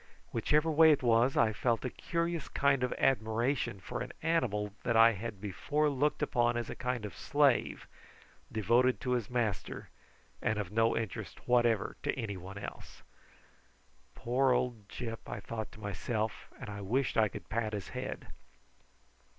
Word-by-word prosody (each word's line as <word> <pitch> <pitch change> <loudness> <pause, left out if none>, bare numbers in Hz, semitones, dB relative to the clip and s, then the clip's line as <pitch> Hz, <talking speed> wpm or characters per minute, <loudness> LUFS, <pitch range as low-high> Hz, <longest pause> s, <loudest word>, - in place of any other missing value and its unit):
Whichever 150 +8 +2
way 160 +1 +7
it 145 - +2
was, 120 +2 +3
I 110 -1 +4
felt 115 +3 0
a 125 - -2
curious 170 -2 -2
kind 140 -2 +2
of 125 - 0
admiration 115 -2 +1
for 95 - -5
an 125 - -5
animal 110 -11 0
that 115 -1 +1
I 115 +1 +8
had 105 -1 -6
before 145 +10 0
looked 145 +2 +1
upon 120 -2 +2
as 120 - -3
a - - -6
kind 125 -3 -2
of 105 - -7
slave, 145 -4 +2 0.7
devoted 120 +4 +3
to 125 - -2
his 120 -4 0
master, 120 -5 -2 0.5
and 110 -2 0
of 100 -3 -3
no 115 +1 +2
interest 110 -5 -5
whatever 120 -3 +2
to - - 0
anyone 95 -3 -5
else. 100 - -9 1.1
"Poor 130 +2 +2
old 120 -5 -2
Gyp!" 115 -2 -5
I - - -4
thought 110 +1 -5
to - - -13
myself, 110 +2 -3
and - - -7
I 100 0 -6
wished 120 +6 0
I 110 -1 +4
could - - -9
pat 110 -1 -2
his 100 -3 -4
head. - - -5
115 Hz, 160 wpm, -32 LUFS, 110-130 Hz, 1.1 s, I